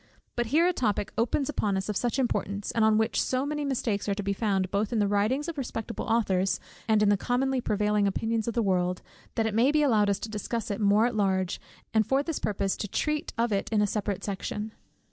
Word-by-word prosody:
But 240 -1 0
here 315 +8 +4
a 360 - +2
topic 210 - -1
opens 245 +4 +1
upon 210 -9 0
us 190 - -3
of 210 - -2
such 240 +5 0
importance, 205 -6 -1
and 225 - +1
on 220 0 +4
which 220 0 +1
so 260 +1 0
many 295 0 -2
mistakes 230 -7 -1
are 200 - +1
to 205 - -4
be 200 0 0
found 195 -3 0
both 200 +1 0
in 235 - 0
the 205 -1 +2
writings 215 +9 +1
of 330 -4 -4
respectable 230 -3 -4
authors, 195 -4 +1 0.3
and 215 -1 +4
in 205 - +4
the 205 - +4
commonly 255 +4 0
prevailing 210 -1 +1
opinions 225 +3 -1
of 235 - -2
the 235 - +2
world, 180 -2 0 0.3
that 225 - +1
it 220 - -1
may 240 +6 +4
be 305 0 +3
allowed 215 -7 +3
us 200 - +2
to - - -3
discuss 215 +1 -3
it 200 - -3
more 205 +2 +4
at 245 - 0
large, 190 -3 0 0.3
and 220 -2 +3
for 270 +1 +2
this 325 -1 -3
purpose 195 -2 -1
to 210 - -3
treat 300 - -1
of 230 0 +1
it 195 - -1
in 215 - +2
a 210 - +4
separate 205 -2 -2
section. 210 +2 -4
215 Hz, 240 wpm, -28 LUFS, 200-245 Hz, 0.3 s, here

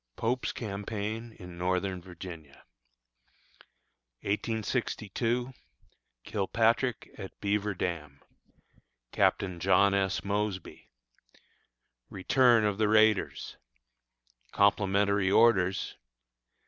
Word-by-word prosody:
POPE'S 125 +3 -1
CAMPAIGN 110 +2 -5
IN 90 -4 -11
NORTHERN 90 +1 -1
VIRGINIA. 85 -5 -11 1.6
1862. 115 +3 -2 0.7
Kilpatrick 115 +5 0
at 95 -2 -9
Beaver 105 0 -1
Dam. 75 -6 -4 0.9
Captain 90 -3 +1
John 100 +2 +4
S. 100 -1 0
Mosby. 100 -2 -3 1.2
Return 115 +3 +3
of 105 0 -1
the 110 - +3
Raiders. 110 -1 +2 0.9
Complimentary 100 -1 +2
Orders. 95 -4 +3
100 Hz, 70 wpm, -29 LUFS, 95-110 Hz, 1.6 s, John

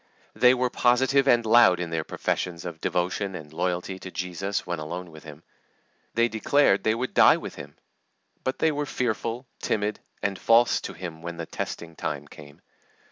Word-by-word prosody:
They 125 0 +5
were 125 -1 0
positive 130 +3 +3
and 120 -3 +4
loud 110 -5 +6
in 85 -2 -4
their 80 -1 -1
professions 85 +1 -3
of 85 -2 -7
devotion 95 +2 -1
and 75 -3 -9
loyalty 90 +2 -2
to 95 - -8
Jesus 90 +2 -3
when 85 -2 -3
alone 85 +3 -6
with 80 0 -13
Him. 75 +1 -11 0.7
They 115 +1 +4
declared 110 0 +2
they 110 0 +2
would 125 +2 -3
die - - +7
with - - -7
Him. - - -10 0.7
But 130 - -2
they 160 - +2
were 145 0 -3
fearful, 120 0 -2
timid, 105 0 -1 0.2
and 100 -2 -1
false 115 +1 +4
to - - -8
Him 85 -2 -8
when 85 0 -6
the 85 - -4
testing 85 0 -6
time 75 -1 -4
came. 75 -1 -14
95 Hz, 180 wpm, -26 LUFS, 85-120 Hz, 0.7 s, die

